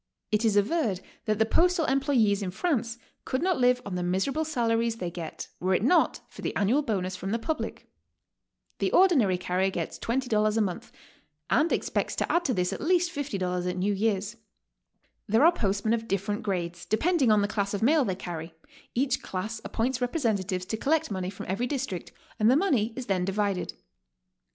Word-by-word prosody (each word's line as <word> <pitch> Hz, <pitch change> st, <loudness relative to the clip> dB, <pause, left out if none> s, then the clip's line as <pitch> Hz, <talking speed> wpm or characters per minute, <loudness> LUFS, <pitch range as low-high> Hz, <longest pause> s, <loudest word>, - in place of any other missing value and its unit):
It 210 Hz, +1 st, +2 dB
is 220 Hz, -3 st, +3 dB
averred 210 Hz, -, +1 dB, 0.3 s
that 215 Hz, -1 st, +1 dB
the 220 Hz, -, +3 dB
postal 350 Hz, -, +3 dB
employes 255 Hz, -7 st, +2 dB
in 190 Hz, -, -2 dB
France 235 Hz, -, -1 dB, 0.3 s
could 260 Hz, +4 st, -2 dB
not 370 Hz, -4 st, +1 dB
live 250 Hz, 0 st, +3 dB
on 200 Hz, -, -5 dB
the 180 Hz, -, -2 dB
miserable 190 Hz, -, 0 dB
salaries 230 Hz, -6 st, 0 dB
they 180 Hz, -6 st, -4 dB
get 170 Hz, -2 st, -7 dB
were 185 Hz, +1 st, +1 dB
it 190 Hz, -, 0 dB
not 350 Hz, +9 st, +3 dB
for -, -, -12 dB
the -, -, -3 dB
annual 225 Hz, +9 st, +2 dB
bonus 190 Hz, -8 st, -2 dB
from 185 Hz, +1 st, -5 dB
the 225 Hz, -, +1 dB
public. 310 Hz, +7 st, -4 dB, 0.9 s
The -, -, 0 dB
ordinary 270 Hz, -, +5 dB
carrier 180 Hz, +1 st, 0 dB
gets -, -, -4 dB
$20 225 Hz, -3 st, +1 dB
a -, -, +3 dB
month, 190 Hz, -5 st, -2 dB, 0.6 s
and 320 Hz, +3 st, +3 dB
expects -, -, -1 dB
to -, -, -1 dB
add 345 Hz, 0 st, +2 dB
to 255 Hz, -, +1 dB
this 180 Hz, 0 st, 0 dB
at -, -, -6 dB
least 345 Hz, +1 st, +2 dB
$50 185 Hz, -10 st, -2 dB
at 180 Hz, -, -3 dB
New 200 Hz, +3 st, +1 dB
Year's. 205 Hz, +1 st, -1 dB, 0.9 s
There 225 Hz, +7 st, +4 dB
are 335 Hz, -, +8 dB
postmen 210 Hz, -, 0 dB
of 225 Hz, -1 st, -2 dB
different 200 Hz, +2 st, -1 dB
grades, 175 Hz, -5 st, -3 dB
depending 305 Hz, +2 st, +2 dB
on 210 Hz, -1 st, +4 dB
the -, -, +1 dB
class 200 Hz, -1 st, -1 dB
of 200 Hz, -, -2 dB
mail 295 Hz, +4 st, +4 dB
they 190 Hz, -6 st, -1 dB
carry; 165 Hz, -2 st, -7 dB, 0.4 s
each 260 Hz, +1 st, +1 dB
class 215 Hz, +4 st, -4 dB
appoints 250 Hz, +2 st, -1 dB
representatives 210 Hz, -, -1 dB
to 220 Hz, +3 st, -3 dB
collect 315 Hz, +3 st, +1 dB
money 185 Hz, -2 st, -2 dB
from 195 Hz, -, -8 dB
every 205 Hz, +7 st, -1 dB
district, 250 Hz, -, -4 dB, 0.3 s
and 215 Hz, +1 st, +5 dB
the 255 Hz, -, +5 dB
money 265 Hz, -, +2 dB
is 260 Hz, -, -5 dB
then 190 Hz, -4 st, 0 dB
divided. 195 Hz, 0 st, -1 dB
220 Hz, 190 wpm, -27 LUFS, 190-265 Hz, 0.9 s, are